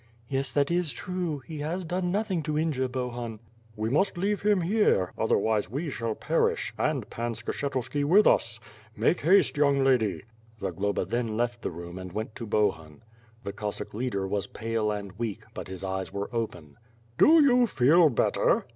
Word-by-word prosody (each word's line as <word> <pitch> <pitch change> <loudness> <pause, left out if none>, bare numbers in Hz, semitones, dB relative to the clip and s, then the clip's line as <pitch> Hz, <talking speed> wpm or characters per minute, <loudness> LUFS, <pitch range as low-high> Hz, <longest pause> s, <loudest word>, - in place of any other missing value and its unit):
"Yes, 135 -1 -1
that 145 +2 +2
is 175 -3 +1
true; 175 -3 -3
he 155 -2 -7
has 165 +5 -3
done 180 +1 -2
nothing 195 -3 0
to 150 0 -2
injure 150 -5 0
Bohun." 120 -3 -4 0.4
"We 110 +1 -2
must 190 +6 +2
leave 200 +3 0
him 205 -2 +3
here; 175 - +2
otherwise 110 -2 +1
we 145 +6 -3
shall 115 -3 -3
perish - - 0
— - - -24
and - - -3
Pan 120 0 -3
Skshetuski 135 +5 -2
with 190 +9 +5
us. 115 0 +2 0.4
Make 120 +11 +2
haste, 180 0 +4
young 140 -2 +3
lady." 110 - +2 0.4
Zagloba 100 0 -1
then 115 +2 -2
left 120 0 -1
the - - -2
room 85 +1 -8
and 90 -1 -7
went 110 +3 -4
to 115 - -6
Bohun. 95 -5 -1 0.4
The 100 - -5
Cossack 105 -1 -5
leader 105 -4 -2
was 100 0 -2
pale 115 -1 -2
and 100 -2 -5
weak, 115 -4 -3
but - - -7
his 95 0 -7
eyes 95 0 -3
were 100 +3 -5
open: 90 -11 -4 0.4
"Do 320 0 +7
you 250 -3 +5
feel 155 - +5
better?" 120 - +2
120 Hz, 175 wpm, -27 LUFS, 105-160 Hz, 0.4 s, Do